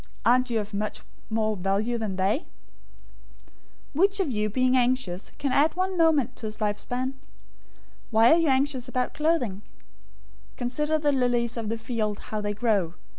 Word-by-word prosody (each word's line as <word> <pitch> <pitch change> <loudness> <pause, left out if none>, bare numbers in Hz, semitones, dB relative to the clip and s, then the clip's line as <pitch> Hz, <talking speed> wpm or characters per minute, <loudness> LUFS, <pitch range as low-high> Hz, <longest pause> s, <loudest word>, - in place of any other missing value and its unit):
Aren't 255 +2 +4
you 230 -2 +1
of 210 0 -6
much 210 +1 -3 0.3
more 220 -1 0
value 200 +5 0
than 210 -4 -3
they? 195 +7 +1
006:027 - - -22 1.5
"Which 390 +6 +2
of 350 -8 0
you, 215 -2 0
by - - -13
being 255 +1 +3
anxious, 245 -7 0
can 280 -2 -1
add 295 +5 +3
one 370 +1 -1
moment{literally, 325 -2 +4
cubit} 255 - -28
to - - -6
his 215 0 -6
lifespan? 215 +4 -2
006:028 265 - -5 1.0
Why 225 +1 +5
are 330 - +6
you 330 -3 +2
anxious 265 -1 +1
about 255 0 -1
clothing? 300 - 0 1.0
Consider 300 +6 0
the 295 -1 +1
lilies 245 -3 +1
of 225 -3 -3
the 225 - -1
field, 225 -2 -2
how 215 -1 -1
they 205 0 -2
grow. 200 -7 +1
240 Hz, 180 wpm, -26 LUFS, 215-275 Hz, 1.5 s, are